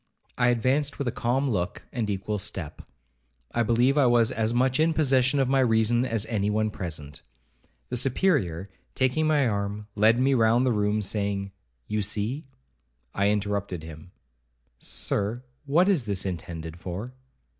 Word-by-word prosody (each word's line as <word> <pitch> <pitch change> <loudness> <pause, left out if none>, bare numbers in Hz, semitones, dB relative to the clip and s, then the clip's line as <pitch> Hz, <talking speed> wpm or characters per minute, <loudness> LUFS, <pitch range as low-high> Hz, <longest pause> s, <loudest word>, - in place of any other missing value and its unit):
I 125 - +2
advanced 130 +5 +1
with 140 - -3
a - - +1
calm 130 +5 0
look, 90 -8 -2
and 115 -4 -2
equal 100 +1 -2
step. 90 -5 -4 0.7
I 120 - 0
believe 120 +5 +3
I 135 - +5
was 120 0 +3
as 110 -3 0
much 130 +2 +1
in 160 0 +3
possession 135 -2 +3
of 135 - +2
my 135 +1 +2
reason 120 0 +3
as 115 -3 0
any 105 -3 -1
one 110 0 0
present. 75 -6 -6 0.7
The 125 - -2
Superior, 120 - +1 0.3
taking 130 +5 +1
my 145 -4 +3
arm, 100 0 -2
led 110 +3 +4
me 135 +2 +3
round 115 +1 +3
the 130 - +2
room, 105 0 0
saying, 100 -1 -2 0.3
'You 105 - -1
see—' 105 +8 -2 0.7
I 100 +1 +2
interrupted 100 -4 -2
him—'Sir, 65 - -6 0.2
what 170 +7 +4
is 175 - +2
this 100 -3 -2
intended 85 -2 -6
for?' 95 +9 -6
110 Hz, 155 wpm, -26 LUFS, 100-130 Hz, 0.7 s, I